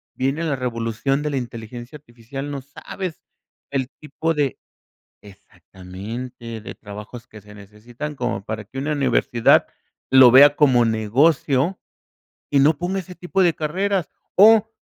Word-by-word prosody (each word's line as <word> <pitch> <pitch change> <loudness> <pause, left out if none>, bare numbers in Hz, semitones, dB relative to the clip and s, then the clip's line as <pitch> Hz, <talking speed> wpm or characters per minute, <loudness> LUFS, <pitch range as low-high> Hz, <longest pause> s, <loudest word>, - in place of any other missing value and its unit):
viene 135 +5 -1
la 155 -4 0
revolución 120 +2 -2
de 150 - -1
la 140 - -1
inteligencia 120 +2 -7
artificial, 135 +1 -8
no 140 -2 -5
sabes 160 +5 -8 0.5
el 135 -2 -2
tipo 160 +2 -2
de 145 -3 -1 0.7
Exactamente, 100 +5 -9
de - - -9
trabajos 105 +3 -10
que 105 - -13
se 105 +1 -16
necesitan, 115 +8 -9
como 125 -5 -3
para 110 0 -5
que 120 +6 -10
una 140 +3 -2
universidad 135 -4 +3 0.4
lo 130 -2 +8
vea 145 +3 +8
como 130 -5 +4
negocio 130 - +1 0.7
y 140 - +3
no 145 +2 +4
ponga 185 +4 -2
ese 180 0 -10
tipo 180 +2 0
de 175 -2 +3
carreras, 185 +3 -1 0.3
o 220 +2 +6
130 Hz, 140 wpm, -21 LUFS, 115-150 Hz, 0.7 s, lo